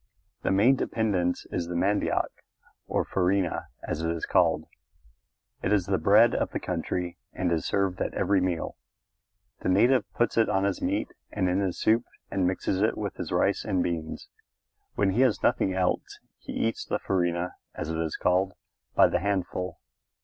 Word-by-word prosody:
The - - 0
main 105 +8 +5
dependence 95 -8 0
is 85 -2 -2
the 85 - -4
mandioc, 100 +4 +1 0.6
or - - 0
farina, 95 -1 0 0.2
as 80 - -3
it 80 - -1
is 85 -1 -2
called. 85 -4 +2 1.0
It 95 - -1
is 100 -4 +3
the 95 -2 0
bread 105 +8 +6
of - - 0
the - - -3
country 90 -1 -3
and 90 -1 -1
is 80 -3 0
served 95 -2 0
at - - -2
every 100 -2 +2
meal. 90 -3 -2 0.8
The - - -2
native 120 +6 +3
puts 120 -1 +1
it 115 - +4
on 95 -2 +1
his 100 -1 0
meat - - 0 0.2
and 95 -3 0
in 90 +2 +1
his 95 -3 -1
soup 115 +2 +3 0.3
and 95 -2 +1
mixes 95 +1 -1
it 110 - +2
with 100 -2 -4
his - - -5
rice - - +2
and 90 -2 0
beans. 80 -2 -4 0.7
When 100 -1 +2
he 115 +7 +2
has 130 -5 +2
nothing 95 - +2
else 90 -1 -1 0.2
he - - -8
eats 115 - -1
the - - -1
farina, 85 -1 -1 0.2
as 80 - -4
it 80 - -2
is 80 -2 -2
called, 95 +1 +2 0.4
by - - +7
the - - 0
handful. 95 -1 -2
95 Hz, 180 wpm, -27 LUFS, 90-100 Hz, 1.0 s, by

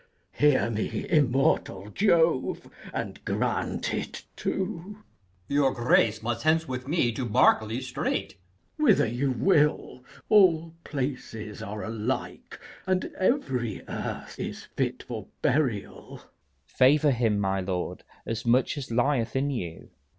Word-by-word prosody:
Hear 145 -5 +3
me, 110 -1 -2
immortal 130 - +1
Jove, 165 - +2 0.2
and - - -5
grant - - -1
it - - -4
too! 190 +1 -3
Berk. 210 - -24 0.4
Your 140 -1 +3
grace 115 -2 +3
must 120 0 -2
hence 160 +1 +2
with 130 0 -5
me 145 -6 +2
to 125 +3 -4
Berkeley 110 +1 +3
straight. 130 - -2
K. - - -23 0.4
Edw. - - 0
Whither - - +5
you 120 +5 -1
will: 150 -4 +1 0.2
all 170 -6 +4
places 125 -6 -5
are 105 +2 -5
alike, 110 +3 -4 0.3
And 185 0 0
every 130 - 0
earth - - -5
is - - -5
fit - - -1
for - - -7 0.2
burial. 125 -8 -1
Leices. - - -15 0.4
Favour 145 +3 +4
him, 115 -4 +1
my 95 -1 0
lord, 90 -1 -3 0.2
as 115 0 -3
much 125 +5 +2
as 135 - -7
lieth 120 +1 +1
in 140 +2 +1
you. 85 -11 -6
130 Hz, 135 wpm, -27 LUFS, 115-155 Hz, 0.4 s, Whither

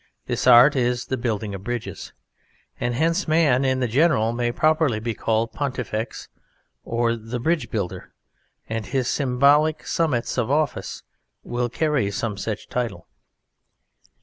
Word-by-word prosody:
This - - -2
art 125 +4 +8
is 125 -1 0
the 130 - -2
building 110 -4 -2
of 95 -1 -7
bridges. 120 0 -5 0.7
And 120 0 -1
hence 165 +7 +1
man 155 -5 +3
in 130 -1 +1
the 125 - +1
general 115 -3 +2
may 120 0 0
properly 155 -4 +2
be 115 +1 -3
called 115 +1 0
Pontifex, 125 -5 -4 0.6
or 115 0 0
"The 115 +2 -6
Bridge 160 +6 0
Builder"; 100 -6 -4 0.6
and 110 -1 -4
his 130 -3 -1
symbolic 140 +4 +2
summits 130 -7 0
of 120 0 -1
office 150 +1 -1 0.4
will 120 0 -2
carry 150 -5 0
some 105 +1 -3
such 105 +2 -5
title. 115 -8 -3
120 Hz, 140 wpm, -23 LUFS, 115-140 Hz, 0.7 s, art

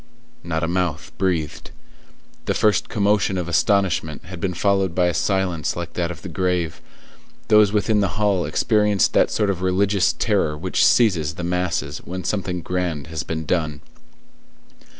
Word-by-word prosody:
Not 80 -1 -2
a - - +1
mouth 85 -3 -2
breathed; 85 -6 -1 0.8
the - - 0
first 105 -1 +2
commotion 100 -2 +1
of 90 -2 -3
astonishment 85 -4 +1
had 90 -1 -8
been 90 -2 -2
followed 95 -1 +1
by 90 - +3
a 90 - +1
silence 95 -6 0
like 85 -1 -6
that 85 -1 -1
of 85 -1 -8
the - - -6
grave; 90 -1 -1 0.7
those 105 -2 +6
within 105 +1 +1
the 100 -3 -1
hall 100 -4 +2
experienced 105 +3 +2
that - - +4
sort 105 -2 +1
of 90 -2 -5
religious 95 +1 +2
terror 75 0 0
which 90 +3 0
seizes 85 -10 +3
the 90 - -6
masses 85 -5 -2
when 90 +1 -7
something 90 -1 -2
grand 90 -4 -2
has 80 - -2
been 80 0 -4
done. 75 -4 -1
90 Hz, 160 wpm, -22 LUFS, 85-100 Hz, 0.8 s, those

